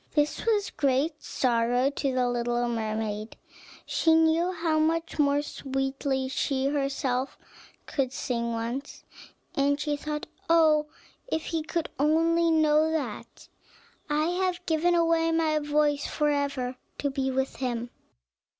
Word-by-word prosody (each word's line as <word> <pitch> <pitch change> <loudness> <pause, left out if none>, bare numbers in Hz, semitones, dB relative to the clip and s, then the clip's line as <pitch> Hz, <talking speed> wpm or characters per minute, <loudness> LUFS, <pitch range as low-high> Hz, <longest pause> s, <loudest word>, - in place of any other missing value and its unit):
This 295 0 +1
was 420 -3 +2
great 285 +3 0
sorrow 245 +2 +1
to 275 -1 -1
the 255 -1 +1
little 240 0 0
mermaid; 220 -1 -3 0.5
she 320 -1 +3
knew 325 +2 +3
how 325 -3 0
much 330 +1 0
more 285 0 +3
sweetly 270 -1 -2
she 265 0 -1
herself 275 -2 -1 0.5
could 265 -3 -1
sing 235 -3 -2
once, 235 +5 -4 0.5
and 285 +1 +1
she 295 -1 -1
thought, 300 +1 -4 0.2
"Oh 310 -2 +5 0.4
if 320 -9 -1
he 325 -1 -1
could 315 +1 -2
only 330 +3 +3
know 310 -1 +4
that! 280 -10 -5 0.6
I 300 +1 +2
have 360 0 -1
given 340 +2 +2
away 330 -1 +3
my 320 -2 +2
voice 295 -1 +1
forever, 280 -4 -1 0.2
to 285 - -1
be 270 -1 -1
with 265 0 -1
him." 240 -2 -3
290 Hz, 130 wpm, -27 LUFS, 260-320 Hz, 0.6 s, Oh